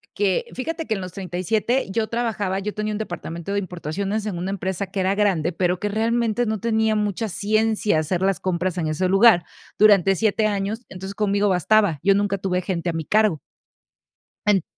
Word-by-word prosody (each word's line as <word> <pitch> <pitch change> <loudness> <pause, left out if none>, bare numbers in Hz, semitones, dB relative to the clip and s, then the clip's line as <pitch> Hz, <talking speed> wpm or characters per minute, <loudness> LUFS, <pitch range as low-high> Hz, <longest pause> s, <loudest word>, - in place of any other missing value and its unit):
Que 195 -2 +1
fíjate 325 +5 -4
que 220 - -1
en 195 - -3
los 185 -1 -6
37 195 +7 -1
yo 220 +2 0
trabajaba, 215 -5 -1
yo 210 +2 -4
tenía 215 0 -2
un 210 - -3
departamento 175 -2 -5
de - - 0
importaciones 195 +4 -3
en 180 -4 -3
una 185 +3 -3
empresa 190 0 -3
que 190 +1 -5
era 190 +1 +1
grande, 185 -5 +1
pero 180 0 0
que 205 - -2
realmente 230 +2 0
no 215 -1 -2
tenía 220 0 +1
mucha 210 +1 -1
ciencia 215 -2 +1
hacer 170 +4 -1
las 195 0 +1
compras 185 0 -1
en 165 - -1
ese 155 +4 0
lugar 195 -3 +6 0.4
durante 195 -3 +5
7 215 +1 +1
años, 210 +3 -2
entonces, 190 +2 -8
conmigo 205 -1 +1
bastaba, 190 -2 +3
yo 195 0 +5
nunca 200 0 0
tuve 185 -1 -1
gente 175 -2 -2
a - - -8
mi 160 -2 -3
cargo. 215 -8 +2 1.1
En 195 -4 +4
200 Hz, 190 wpm, -22 LUFS, 185-215 Hz, 1.1 s, lugar